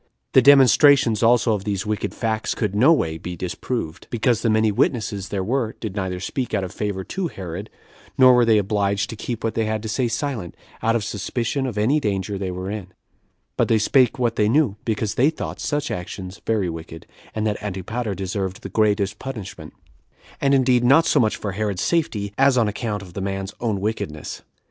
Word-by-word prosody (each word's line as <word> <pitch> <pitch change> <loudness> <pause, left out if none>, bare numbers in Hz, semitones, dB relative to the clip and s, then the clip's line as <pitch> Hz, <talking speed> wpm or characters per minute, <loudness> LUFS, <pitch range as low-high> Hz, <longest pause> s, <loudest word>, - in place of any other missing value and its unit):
The - - +7
demonstrations 135 -4 +6
also 120 0 +4
of 100 -2 -2
these 100 -1 -2
wicked 105 0 -2
facts 110 -1 -1
could 105 -4 -1
no 125 +10 +5
way 80 - +1
be 90 +2 -6
disproved, 90 0 -4
because 120 -1 +1
the 115 - +1
many 110 0 +3
witnesses 100 -2 -1
there 100 -2 -2
were 115 +1 -1
did 105 -4 -5
neither 95 -2 -3
speak 120 +5 -3
out 100 - 0
of 90 - -5
favor 100 -1 -3
to 190 - -3
Herod, 95 - -7 0.5
nor 130 -1 +8
were 125 -1 +5
they 115 -2 +4
obliged 100 +2 0
to - - -6
keep 115 +1 -5
what 115 - -1
they 110 - 0
had 110 0 -2
to - - -4
say 120 +3 0
silent, 115 - -3 0.3
out 115 +1 +2
of 115 - 0
suspicion 115 +5 -2
of 115 -5 -5
any 125 +9 +3
danger 100 -5 -2
they 95 -1 -3
were 90 +2 -4
in; 105 -3 -5 0.7
but - - +2
they 115 - +3
spake 125 +3 +3
what 120 -3 0
they 105 0 +3
knew, 135 -5 +2
because 110 -2 -1
they 135 +5 +3
thought 160 - -6
such 145 -1 -2
actions 90 +1 -6
very 110 -5 +1
wicked, 80 -1 -7 0.3
and 110 0 -1
that 105 -1 -1
Antipater 105 +2 -3
deserved 95 +2 -4
the - - -5
greatest 105 -2 +1
punishment; 120 -8 -7 0.7
and 140 0 +4
indeed 130 -2 +3
not 140 +7 +5
so 150 - +3
much 110 -4 +2
for 100 - -4
Herod's 100 -1 -2
safety, 105 -12 -1
as 135 -1 +5
on 115 -3 +3
account 105 -1 -3
of 90 -3 -13
the 100 - -5
man's 95 0 -3
own 110 -5 -1
wickedness. 95 -8 -4
110 Hz, 200 wpm, -22 LUFS, 100-120 Hz, 0.7 s, nor